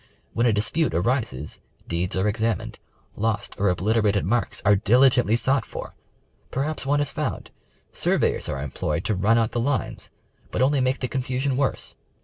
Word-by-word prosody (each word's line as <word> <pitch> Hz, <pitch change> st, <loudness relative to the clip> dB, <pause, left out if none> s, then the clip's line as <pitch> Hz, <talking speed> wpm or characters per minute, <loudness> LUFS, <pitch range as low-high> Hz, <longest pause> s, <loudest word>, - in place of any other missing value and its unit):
When 120 Hz, +1 st, +2 dB
a -, -, +4 dB
dispute 115 Hz, -, +1 dB
arises, 90 Hz, -, -1 dB, 0.3 s
deeds 85 Hz, +2 st, -2 dB
are 95 Hz, +2 st, +1 dB
examined, 110 Hz, -1 st, -1 dB, 0.4 s
lost 110 Hz, -1 st, -1 dB
or 100 Hz, 0 st, +3 dB
obliterated 105 Hz, +2 st, +1 dB
mai'ks 115 Hz, +5 st, 0 dB
are 105 Hz, -, +6 dB
diligently 125 Hz, +2 st, +4 dB
sought 135 Hz, +3 st, +1 dB
for, -, -, -8 dB, 0.6 s
perhaps 140 Hz, +1 st, -3 dB
one 145 Hz, +1 st, +2 dB
is 145 Hz, -, -1 dB
found, -, -, -4 dB, 0.4 s
surveyors -, -, +1 dB
are -, -, -2 dB
em 70 Hz, 0 st, -5 dB
ployed 75 Hz, +3 st, -2 dB
to 110 Hz, -, 0 dB
run 105 Hz, +5 st, +3 dB
out 115 Hz, -1 st, +1 dB
the 120 Hz, -, -1 dB
lines 135 Hz, +3 st, -2 dB, 0.4 s
but 125 Hz, -, 0 dB
only 140 Hz, 0 st, +2 dB
make 130 Hz, +1 st, 0 dB
the 130 Hz, -, 0 dB
confusion 130 Hz, +1 st, -1 dB
worse. 135 Hz, 0 st, -1 dB
115 Hz, 165 wpm, -24 LUFS, 100-130 Hz, 0.6 s, are